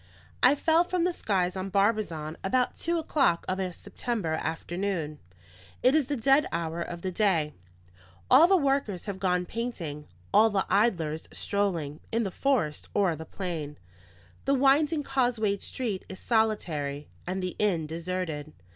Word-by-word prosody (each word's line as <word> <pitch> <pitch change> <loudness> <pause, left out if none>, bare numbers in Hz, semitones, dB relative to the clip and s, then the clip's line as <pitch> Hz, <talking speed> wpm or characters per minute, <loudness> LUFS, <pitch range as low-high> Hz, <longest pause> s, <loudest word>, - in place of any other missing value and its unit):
I 250 +3 +6
fell 320 +3 +3
from 355 -1 -1
the 355 0 +1
skies 185 - 0
on 190 +1 -3
Barbizon 195 -6 0
about 250 +5 +1
two 340 +1 -1
o'clock 285 - +1
of 185 +1 -1
a 185 -1 -1
September 205 -2 -3
afternoon. 165 0 -3 0.6
It 255 - +5
is 305 -4 +3
the 290 - -1
dead 270 +4 +4
hour 165 0 -2
of 170 0 -6
the 185 - -1
day; 175 -6 +1 0.7
all 285 +7 +8
the 385 +1 +5
workers 270 - 0
have 200 -2 -5
gone 180 -2 +1
painting, 175 -11 -5 0.3
all 225 +1 +6
the 200 -2 0
idlers 170 -8 +1
strolling, 170 -8 -1
in 230 +1 +1
the 195 - -3
forest 225 - 0
or 190 -5 +3
the 160 +1 -8
plain; 160 -6 -5 0.7
the 275 - +3
winding 290 +3 +3
causewayed 240 -7 0
street 220 -7 -3
is 190 - -8
solitary, 160 -11 0 0.2
and 185 +1 -2
the 180 - -3
inn 185 -7 +1
deserted. 165 -2 -4
195 Hz, 155 wpm, -28 LUFS, 165-250 Hz, 0.7 s, all